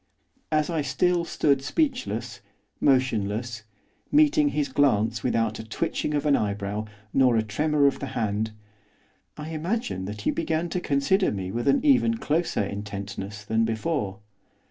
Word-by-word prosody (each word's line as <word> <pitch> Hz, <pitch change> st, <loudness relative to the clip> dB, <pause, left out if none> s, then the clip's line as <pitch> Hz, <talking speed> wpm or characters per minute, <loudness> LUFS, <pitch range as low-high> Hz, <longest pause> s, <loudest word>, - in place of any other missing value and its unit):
As 155 Hz, +2 st, +1 dB
I 160 Hz, -2 st, 0 dB
still 175 Hz, +3 st, +1 dB
stood 140 Hz, -4 st, +1 dB
speechless, 145 Hz, -, -1 dB, 0.4 s
motionless, 120 Hz, -4 st, +1 dB, 0.5 s
meeting 300 Hz, 0 st, +5 dB
his 150 Hz, -, 0 dB
glance 115 Hz, -6 st, +2 dB
without 115 Hz, -3 st, 0 dB
a -, -, -5 dB
twitching 150 Hz, +6 st, -2 dB
of 145 Hz, 0 st, -1 dB
an 145 Hz, -2 st, +4 dB
eyebrow, 100 Hz, 0 st, -2 dB, 0.3 s
nor 130 Hz, -3 st, +4 dB
a 110 Hz, -, +2 dB
tremor 150 Hz, +7 st, +1 dB
of 140 Hz, -, +2 dB
the 140 Hz, -, -4 dB
hand, 110 Hz, -1 st, 0 dB, 0.9 s
I 150 Hz, +1 st, -6 dB
imagine 160 Hz, -, -2 dB
that 105 Hz, +1 st, -6 dB
he -, -, +1 dB
began 165 Hz, +1 st, -1 dB
to 180 Hz, -, -1 dB
consider 145 Hz, +8 st, +2 dB
me 95 Hz, -2 st, -4 dB
with 120 Hz, +5 st, -2 dB
an 140 Hz, -, +3 dB
even 250 Hz, -5 st, +4 dB
closer 165 Hz, -, 0 dB
intentness 100 Hz, 0 st, -6 dB
than 110 Hz, +2 st, +1 dB
before. 110 Hz, -3 st, -1 dB
130 Hz, 145 wpm, -26 LUFS, 105-160 Hz, 0.9 s, meeting